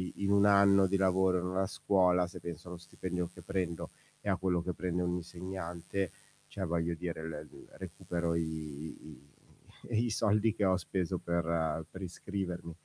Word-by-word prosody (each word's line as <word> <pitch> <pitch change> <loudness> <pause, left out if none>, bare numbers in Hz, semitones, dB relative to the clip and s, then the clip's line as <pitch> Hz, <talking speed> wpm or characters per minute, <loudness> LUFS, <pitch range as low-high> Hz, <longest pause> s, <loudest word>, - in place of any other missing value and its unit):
in 100 0 0
1 100 0 +6
anno 100 -1 +7
di 100 +1 +2
lavoro 95 -1 +4
in 90 - -3
una 95 +1 +1
scuola, 90 -3 +3
se 90 +1 -9
penso 85 0 -7
allo 90 0 -6
stipendio 90 0 -4
che - - -11
prendo 90 -4 -2 0.3
e - - -10
a 95 - +4
quello 90 -2 +1
che 90 +1 -2
prende 90 0 -1
un 90 0 0
insegnante, 90 +1 -4 0.4
cioè, 95 - -4
voglio 85 0 0
dire 85 -1 -4
l 80 -1 -5 0.3
recupero 85 -1 -2
i 85 - +2
i 75 -2 -6 0.7
i - - 0
soldi 105 0 +3
che 100 - +2
ho 95 -1 +5
speso 90 0 -1
per 85 -2 0
per 95 - -9
iscrivermi. 90 -2 -4
90 Hz, 170 wpm, -33 LUFS, 85-95 Hz, 0.7 s, anno